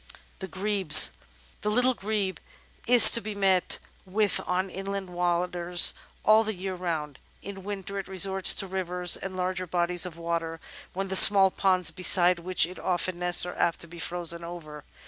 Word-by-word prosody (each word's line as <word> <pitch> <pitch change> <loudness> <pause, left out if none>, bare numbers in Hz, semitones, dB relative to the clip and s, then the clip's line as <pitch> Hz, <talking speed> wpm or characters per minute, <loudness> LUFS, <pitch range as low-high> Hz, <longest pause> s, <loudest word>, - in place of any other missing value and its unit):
The 190 - -8
Grebes 190 -5 +4 0.5
The 210 - -3
Little 250 +4 +1
Grebe 205 -4 -4 0.5
is 245 0 +9
to 230 - +4
be 215 -1 -8
met 190 -2 -1 0.3
with 205 +1 -2
on 185 +1 -2
inland 195 0 -7
waters 175 0 +1 0.3
all 215 +1 +4
the 220 -1 -6
year 190 +1 -7
round. 160 -6 -6 0.2
In 195 0 -10
winter 200 0 -7
it 195 - -8
resorts 190 0 +2
to - - -2
rivers 180 -2 -1
and 190 -1 -8
larger 185 0 -4
bodies 175 +1 -1
of 165 -2 -12
water, 165 -1 -5 0.3
when 195 +1 -6
the 190 - -4
small 195 0 +7
ponds 185 -4 +1
beside 180 0 +1
which 180 0 0
it 180 +2 -11
often 180 0 -3
nests 175 0 +2
are 180 - -7
apt 170 - -2
to 170 - -5
be 170 +1 -13
frozen 170 0 -5
over. 160 -3 -11
185 Hz, 170 wpm, -25 LUFS, 175-195 Hz, 0.5 s, is